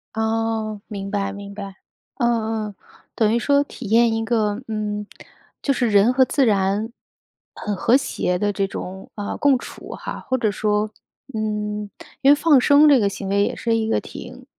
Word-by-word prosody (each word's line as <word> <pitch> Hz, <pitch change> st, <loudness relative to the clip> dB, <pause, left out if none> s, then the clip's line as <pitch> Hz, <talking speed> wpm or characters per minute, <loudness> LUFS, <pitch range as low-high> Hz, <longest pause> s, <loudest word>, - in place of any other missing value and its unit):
哦， 220 Hz, -1 st, -1 dB
明 200 Hz, -2 st, -6 dB
白， 195 Hz, -1 st, -1 dB
明 200 Hz, 0 st, -8 dB
白。 200 Hz, -2 st, -7 dB, 0.4 s
嗯 225 Hz, -3 st, 0 dB
嗯， 205 Hz, -, -10 dB, 0.4 s
等 220 Hz, -1 st, +2 dB
于 235 Hz, -, +3 dB
说 280 Hz, +3 st, +3 dB
体 255 Hz, -6 st, -9 dB
验 230 Hz, +1 st, +4 dB
一 225 Hz, 0 st, -1 dB
个， 220 Hz, -1 st, 0 dB
嗯， 210 Hz, -1 st, -3 dB, 0.6 s
就 275 Hz, -, +1 dB
是 245 Hz, -2 st, +1 dB
人 205 Hz, +4 st, +5 dB
和 260 Hz, 0 st, +5 dB
自 270 Hz, +1 st, +2 dB
然 205 Hz, 0 st, +1 dB, 0.6 s
很 210 Hz, -2 st, -4 dB
和 230 Hz, +6 st, +4 dB
谐 180 Hz, -9 st, -1 dB
的 205 Hz, +1 st, 0 dB
这 195 Hz, 0 st, 0 dB
种， 190 Hz, -1 st, -7 dB
啊， 205 Hz, -1 st, -4 dB
共 280 Hz, -3 st, +3 dB
处 -, -, -10 dB
哈， -, -, -6 dB
或 260 Hz, -, -1 dB
者 220 Hz, -3 st, +1 dB
说， 210 Hz, +1 st, 0 dB, 0.4 s
嗯， 210 Hz, -1 st, -3 dB, 0.3 s
因 275 Hz, -, +6 dB
为 -, -, +7 dB
放 295 Hz, -4 st, +4 dB
生 290 Hz, +3 st, +6 dB
这 285 Hz, -, +7 dB
个 205 Hz, -4 st, +2 dB
行 195 Hz, 0 st, -6 dB
为 200 Hz, +1 st, +2 dB
也 -, -, -1 dB
是 230 Hz, -1 st, 0 dB
一 220 Hz, -1 st, 0 dB
个 -, -, +2 dB
挺 -, -, -10 dB
215 Hz, 195 characters per minute, -22 LUFS, 205-235 Hz, 0.6 s, 为